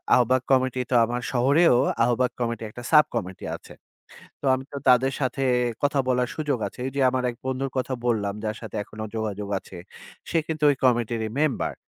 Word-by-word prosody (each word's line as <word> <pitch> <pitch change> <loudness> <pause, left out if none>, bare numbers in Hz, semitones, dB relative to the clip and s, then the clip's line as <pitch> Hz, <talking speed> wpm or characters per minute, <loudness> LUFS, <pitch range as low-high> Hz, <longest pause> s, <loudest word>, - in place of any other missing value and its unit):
আহবায়ক 125 +1 +3
কমিটি 130 -1 +2
তো - - +3
আমার 120 +2 -3
শহরেও 135 +5 +4 0.3
আহবায়ক 125 +1 +1
কমিটি 115 -2 -2
একটা 120 +3 -10
সাব 150 -1 +7
কমিটি 95 -5 -4
আছে। - - -13 0.7
তো - - -5
আমি 130 0 -1
তো 140 - -5
তাদের 130 +2 +4
সাথে 135 +1 -1 0.4
কথা 145 0 +2
বলার 125 -1 +1
সুযোগ 150 -4 -1
আছে। - - -13
ঐ - - -1
যে - - -1
আমার 130 0 -1
এক 120 - -6
বন্ধুর 130 +1 -2
কথা 130 +1 -1
বললাম 105 -4 0
যার 110 0 -2
সাথে 110 -3 -8
এখনো 110 +1 -8
যোগাযোগ 105 -2 -3
আছে। 95 - -14 0.5
সে - - 0
কিন্তু 155 -2 -4
ওই 145 - +3
কমিটির 120 -2 +1
ই - - -10
মেম্বার। 155 -4 0
125 Hz, 190 wpm, -25 LUFS, 115-135 Hz, 0.7 s, সাব